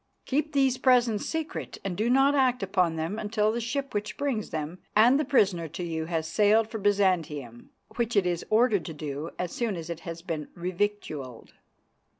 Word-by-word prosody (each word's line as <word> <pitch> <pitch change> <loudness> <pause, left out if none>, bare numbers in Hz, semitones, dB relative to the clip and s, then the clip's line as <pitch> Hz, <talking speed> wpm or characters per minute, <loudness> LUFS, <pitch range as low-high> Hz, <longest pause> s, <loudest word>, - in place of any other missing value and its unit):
"'Keep 300 +3 -1
these 265 -2 +2
Presents 245 -5 +3
secret 320 +2 -4
and 190 -2 -2
do 220 +6 0
not 270 +3 +5
act 255 -3 +2
upon 180 -4 +1
them 165 +7 -3
until 210 0 +1
the 235 +2 -2
ship 275 +4 -3
which 210 +1 -3
brings 270 -7 -1
them 160 +3 -4 0.2
and 240 +6 +6
the - - +2
prisoner 195 - +2
to 165 +4 -6
you 160 -2 -3
has 160 -1 -2
sailed 210 +5 +3
for 220 - -5
Byzantium, 170 - 0 0.3
which 235 -1 0
it 200 -3 +4
is 175 -1 -1
ordered 215 -4 +3
to 160 - -6
do 150 +1 -5
as 180 -1 -3
soon 230 -5 -2
as 165 -1 -6
it 165 - -5
has 165 0 -7
been 160 -5 -4
revictualled. 170 - -3
205 Hz, 185 wpm, -27 LUFS, 165-240 Hz, 0.3 s, and